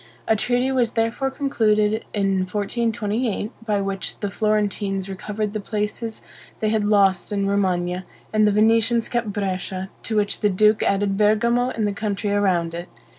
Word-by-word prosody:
A 220 - +4
treaty 245 +4 +1
was 245 -3 +1
therefore 230 +4 0
concluded 220 -6 +1
in 195 -2 +1
1428, 215 +2 -1
by 210 -3 0
which 195 -1 -3
the 205 -1 -3
Florentines 205 -2 0
recovered 205 +2 -4
the 215 - -2
places 215 +2 -4 0.4
they 215 - +1
had 215 -1 +1
lost 200 -2 +3
in 200 -1 0
Romagna; 185 -2 0 0.3
and 215 0 +4
the - - +4
Venetians 225 +2 +3
kept 235 -3 -1
Brescia, 190 -1 -3
to 220 - -3
which 205 -1 +1
the 210 - +2
duke 210 +3 +3
added 195 0 +1
Bergamo 235 +4 +3
and 220 -4 -1
the 205 - -1
country 205 0 -2
around 185 -5 +1
it. 170 +1 -6
210 Hz, 160 wpm, -22 LUFS, 195-225 Hz, 0.4 s, A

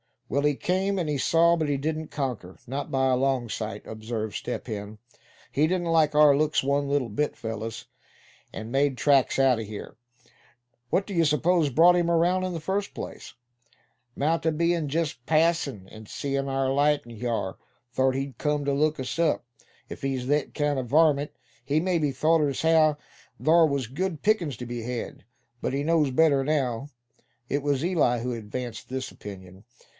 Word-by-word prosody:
"Well, 140 +4 0
he 150 -1 +2
came, 190 +5 0
and 175 -4 -1
he 145 - 0
saw; 170 +4 +4
but 160 -2 -1
he 145 - +1
didn't 155 +2 -3
conquer, 125 -12 -4
not 135 +3 -4
by 135 0 +1
a 130 - +3
long 130 -3 0
sight," 105 -1 -5
observed 110 -1 -5
Step 125 - -4
Hen. 105 -2 -6 0.5
"He 150 +3 +2
didn't 175 -1 -1
like 155 -2 +3
our 150 -2 +7
looks 155 0 +1
one 140 +1 +1
little 140 -4 0
bit, 145 +9 -1
fellows, 110 0 -5 0.7
and 110 +1 -7
made 135 0 +1
tracks 140 -2 +3
out 135 -3 +4
of 110 - -5
here. 105 +1 -8 0.9
What 195 - +1
d'ye 180 -5 +1
s'pose 160 +1 +2
brought 170 +7 +5
him 170 -1 +1
around, 175 +2 +2
in 185 - -3
the 165 - -4
first 195 +5 -2
place?" - - -8 0.8
"Mout 160 +3 0
a 160 - +2
be'n 170 0 +1
jest 155 -3 -2
passin', 155 - +1
an' 110 0 -11
seein' 140 +4 -3
our 135 -1 0
light 145 +1 +3
in 115 -2 -11
hyar, 115 -6 -2 0.3
thort 130 +1 +1
he'd 135 0 -4
cum 150 -1 0
ter 140 - +1
look 150 0 +1
us 130 +5 -4
up. 165 -3 +1 0.4
If - - -8
he's 135 -2 -2
thet 145 +2 0
kind 145 -2 0
o' - - -2
a - - -8
varmint, 145 +1 +3 0.3
he 140 +4 +1
mebbe 165 -6 0
thort 155 +1 +3
as 135 - -3
how 160 -2 +4 0.5
thar 165 +1 +5
was 140 -3 -1
good 160 +6 -4
pickin's 175 - +1
ter 125 - -6
be 120 0 -5
bed. 120 +1 -5 0.4
But - - -2
he 140 +1 -1
knows 160 -2 +2
better 140 0 +3
now." 135 -3 -1 0.6
It 145 - 0
was 140 0 0
Eli 155 -9 +2
who 125 +2 -3
advanced 115 0 -6
this 130 0 -4
opinion. 95 -1 -11
140 Hz, 185 wpm, -26 LUFS, 125-160 Hz, 0.9 s, our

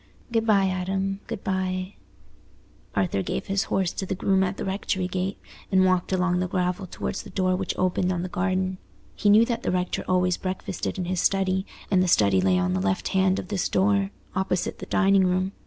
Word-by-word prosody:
"Good 225 -1 +1
bye, 200 -3 +4
Adam, 190 +1 -1
good 230 -4 -5
bye." 185 0 -2 1.0
Arthur 95 0 +1
gave - - -3
his 195 +2 0
horse 190 -3 0
to 190 - -4
the 190 - -2
groom 190 +1 +2
at 190 +1 -2
the - - -4
rectory 190 -1 -1
gate, 185 +1 -2 0.3
and 190 -1 +5
walked 185 0 +1
along 180 -1 +1
the 185 - 0
gravel 180 +1 -1
towards 190 - -4
the - - -12
door 185 -1 +1
which 190 0 -3
opened 185 0 +1
on 175 -1 -2
the - - -3
garden. 185 0 -1 0.4
He 205 - +2
knew 215 +3 +7
that 235 0 -2
the - - -2
rector 180 0 -1
always 180 -1 +2
breakfasted 185 +2 -4
in 185 - -2
his 180 0 -1
study, 190 -1 +1 0.2
and 185 -2 +4
the 185 - +2
study 100 - +4
lay 95 -1 +3
on 90 0 +1
the 95 - 0
left 95 0 0
hand 190 0 +2
of - - -5
this 200 -4 -1
door, 195 +1 +2 0.3
opposite 185 -1 -1
the 185 - -7
dining 195 -2 +4
room. 185 +1 0
185 Hz, 205 wpm, -25 LUFS, 180-195 Hz, 1.0 s, knew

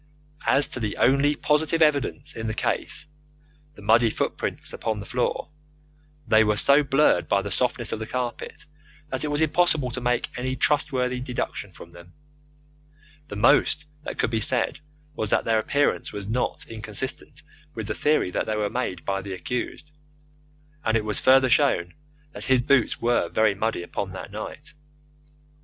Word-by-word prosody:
As 140 - +4
to - - -5
the 110 -3 -3
only 140 +3 +3
positive 160 +3 +2
evidence 145 -1 0
in 115 0 -4
the 110 - -3
case - - -2 0.7
the - - -13
muddy 115 +1 +4
footmarks - - -3
upon 110 -2 -3
the 100 - -7
floor 125 +4 -2 0.8
they 110 0 +5
were 105 -1 +1
so 140 +6 +5
blurred 145 +1 +2
by 100 0 +2
the 100 - -5
softness 120 +1 -1
of - - -3
the 110 - -5
carpet 125 +4 -5 0.4
that 130 0 -2
it - - -1
was 145 +1 0
impossible 160 -4 +2
to 125 - -5
make 125 0 0
any 130 +1 -2
trustworthy 130 -3 +1
deduction 125 -5 -4
from 85 -1 -13
them. 85 +1 -15 1.1
The 105 - -7
most 145 +7 +3 0.2
that - - -6
could - - 0
be 110 - 0
said 120 +3 +4 0.3
was 110 -8 -3
that - - +2
their 115 -1 +2
appearance 145 +6 0
was 100 -1 -6
not 115 +5 -1
inconsistent 110 +3 -4 0.3
with - - -4
the - - -3
theory 150 -11 +1
that - - -2
they 110 - -1
were 105 -1 -1
made 95 -9 -3
by 95 0 -1
the 95 0 -6
accused, 125 +8 -5 0.9
and 110 0 +2
it 110 - -3
was 105 - +1
further 130 0 +5
shown 120 - +2 0.4
that - - -8
his 130 -2 +3
boots 130 -1 +2
were 120 +1 +1
very 110 -1 +2
muddy 105 -2 -2
upon 95 +2 -5
that 95 - -8
night. 145 +9 -7
120 Hz, 170 wpm, -25 LUFS, 105-140 Hz, 1.1 s, they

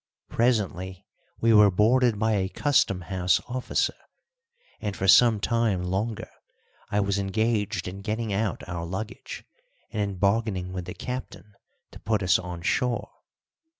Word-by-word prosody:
Presently 95 -6 0 0.3
we 115 0 +4
were 105 -1 +7
boarded 115 +4 +3
by 110 +2 +1
a 95 -3 0
Custom 115 -8 +1
House 90 +1 +1
officer, 125 +1 -1 0.9
and 105 -2 -4
for 95 - -1
some 115 0 +7
time 110 -5 +1
longer 100 +5 -3 0.6
I 105 - +1
was 100 0 +1
engaged 105 +1 -1
in 95 +2 -7
getting 110 0 -2
out 105 -1 -2
our 85 -1 -4
luggage 95 +6 -6 0.5
and 105 - -2
in 100 -2 -2
bargaining 100 -2 0
with 90 -1 -4
the 90 - -7
captain 125 -4 -7 0.4
to - - -12
put 105 -1 0
us 90 - +4
on 90 -2 -7
shore. 125 +5 0
105 Hz, 145 wpm, -26 LUFS, 95-115 Hz, 0.9 s, were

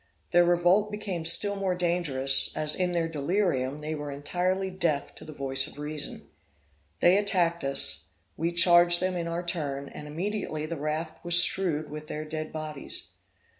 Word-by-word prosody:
Their 175 0 +5
revolt 175 +4 +2
became 200 -6 -4
still 200 +5 +5
more 195 -2 -1
dangerous, 170 -7 +3
as, 150 0 +3
in 180 -1 -1
their 170 -1 0
delirium, 150 -3 -1
they 155 +1 -4
were 145 -1 -6
entirely 180 +7 -2
deaf 170 -6 -2
to - - -13
the - - -10
voice 135 -1 0
of - - -12
reason. 150 0 -5 0.7
They 180 +3 +5
attacked 175 -4 +1
us, 135 0 -2 0.3
we 165 +2 -2
charged 175 0 +6
them 185 0 -1
in 170 -1 -3
our 170 +1 -3
turn, 140 -5 -3
and 150 - -10
immediately 165 -1 -4
the 165 +2 -5
raft 155 +2 -4
was 175 0 +5
strewed 170 -5 +2
with 150 0 -8
their 155 +1 -5
dead 155 0 -6
bodies. 155 - -6
165 Hz, 170 wpm, -27 LUFS, 150-180 Hz, 0.7 s, charged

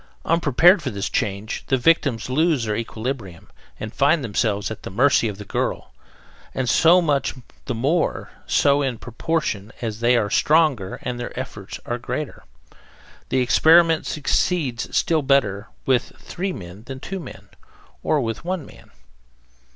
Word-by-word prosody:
Unprepared 170 +3 +4
for 145 - -3
this 100 -4 -3
change, 105 -2 -2
the 130 - +2
victims 130 -6 +2
lose 150 -1 +1
their 105 -1 -1
equilibrium 115 -5 -5 0.3
and 110 0 -6
find 145 +2 +3
themselves 105 -2 -1
at 110 - -7
the - - -7
mercy 120 +4 +3
of 105 -2 -5
the 105 - -9
girl, - - -3 0.6
and 130 -1 -1
so 165 +9 +5
much 145 -4 0 0.3
the 125 - -3
more 145 +9 0 0.2
so 140 0 +3
in 130 -4 -1
proportion 115 -4 -3
as 110 -3 -4
they 120 +1 +3
are 105 - +1
stronger 150 - +2
and 125 -1 -4
their 120 +1 -5
efforts 105 -7 -7
are 120 0 -3
greater. 130 +5 -5 0.9
The 130 - +2
experiment 160 +5 +5
succeeds 145 -4 -1
still 160 -2 +2
better 115 -7 +1 0.2
with 130 -2 +1
three 190 +2 -4
than 90 - -9
with 135 -1 -7
two 195 +1 -4
men, 170 - -11 0.5
or 150 - +1
with 115 -2 -4
one 175 -3 -3
man. - - -16
130 Hz, 150 wpm, -22 LUFS, 110-155 Hz, 0.9 s, so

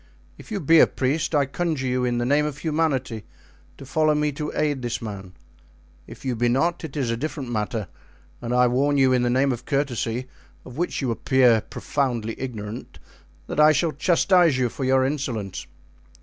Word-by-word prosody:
If - - -15
you 205 - -2
be 165 0 +5
a - - +7
priest, 145 +4 -1
I 145 -1 +3
conjure 155 -1 -2
you 125 0 0
in 120 -1 0
the 120 - 0
name 145 +4 +3
of 150 -2 -5
humanity 145 -8 -1 0.5
to 135 - -10
follow 155 +3 +2
me 150 0 +1
to 150 +1 -4
aid 145 -3 0
this 120 -1 -3
man; 100 -4 -7 0.7
if - - -12
you 130 -2 -1
be 120 +1 +1
not, 170 +9 0
it 155 -2 -6
is 125 -5 0
a - - 0
different 140 -1 -5
matter, 105 -2 -2 0.5
and 120 - -4
I 125 0 +4
warn 140 +4 +2
you 130 -1 +4
in 125 - +2
the 120 - +1
name 135 +3 +2
of 125 0 -5
courtesy, 130 -4 -1 0.4
of 125 - -11
which 170 -2 -2
you 125 - 0
appear 125 -1 +3
profoundly 120 -5 -2
ignorant, 115 -3 -6 0.5
that - - -4
I 155 0 +7
shall 165 +1 +1
chastise 170 0 +3
you 125 -2 +1
for 130 - -4
your 130 0 +3
insolence." 125 -9 -3
130 Hz, 190 wpm, -24 LUFS, 120-150 Hz, 0.7 s, a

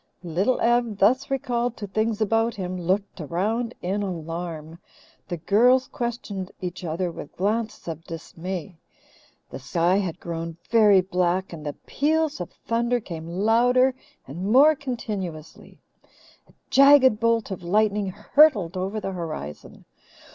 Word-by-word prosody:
Little 180 +9 0
Ev, 235 -3 +2
thus 250 +8 +3
recalled 245 -3 -1
to 210 - -5
things 220 +2 -1
about 225 +2 +1
him, 185 -2 -4
looked 185 +2 -2
around 215 +10 -2
in 195 +3 -1
alarm. 165 -3 -5 0.5
The 175 - -4
girls 245 +10 +3
questioned 220 -6 -4
each 180 0 -6
other 170 +2 -2
with 150 - -10
glances 215 +3 -2
of 165 -1 -5
dismay. 170 +2 -7 0.7
The - - -7
sky 170 +7 +1
had 185 -4 -2
grown 165 -1 -5
very 210 -4 +6
black, 180 0 -1
and 155 -2 -8
the 145 -1 -4
peals 310 - 0
of 175 - -5
thunder 235 +1 -1
came 165 -7 -8
louder 235 +8 +3 0.3
and 175 +9 -4
more 285 +6 +7
continuously. 205 - -6 0.7
A - - -22 0.2
jagged 275 -5 +6
bolt 230 -2 +1
of 190 - -5
lightning 205 +3 +1
hurtled 210 - +3
over 190 +4 -2
the 195 - -4
horizon. 160 - -7
195 Hz, 135 wpm, -24 LUFS, 175-235 Hz, 0.7 s, more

